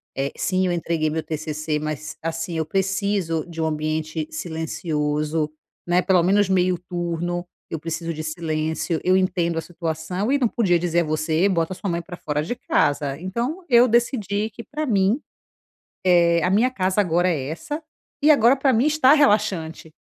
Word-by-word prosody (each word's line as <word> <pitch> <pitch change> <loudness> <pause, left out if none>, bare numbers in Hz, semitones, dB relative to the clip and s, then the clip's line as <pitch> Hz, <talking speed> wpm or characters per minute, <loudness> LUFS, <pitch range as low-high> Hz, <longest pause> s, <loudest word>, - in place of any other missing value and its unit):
eh, 135 +1 -1
sim, 185 -1 +1
eu - - 0
entreguei 165 -2 0
meu 160 +1 -2
TCC, 155 0 -3
mas 155 0 -5
assim, 165 +1 -3
eu 160 - 0
preciso 195 -3 0
de 165 -1 -8
um 160 - +1
ambiente 155 0 -2
silencioso, 155 -1 -2 0.3
né. 175 +1 +3
Pelo 185 -2 +3
menos 200 +3 +3
meio 185 -1 +2
turno, 175 0 -3 0.2
eu 160 - -4
preciso 165 +1 -4
de 155 0 -5
silêncio. 160 +1 -2
Eu 185 +1 +4
entendo 175 -3 0
a - - 0
situação 170 - -3
e 285 - +4
não 255 - +2
podia 195 -6 +2
dizer 170 0 0
a - - +1
você: 155 +4 +1
“Bota 170 -1 0
a - - -8
sua 195 - -4
mãe 170 0 -1
pra 175 +1 -8
fora 150 -3 -2
de 210 +10 -3
casa”. 145 - 0
Então 240 - -3
eu 245 -1 +6
decidi 220 -3 +1
que 230 +3 -9
pra 300 +8 -4
mim, 205 0 +2 0.9
eh, 170 -2 +4
a 180 - +2
minha 225 +6 +4
casa 190 -4 +1
agora 175 -1 +1
é 150 -7 -1
essa, 295 - -5 0.4
e 295 - +4
agora 250 -2 +5
pra 270 0 +2
mim 240 +2 +3
está 305 -3 +4
relaxante. 205 - +1
175 Hz, 180 wpm, -23 LUFS, 160-200 Hz, 0.9 s, eu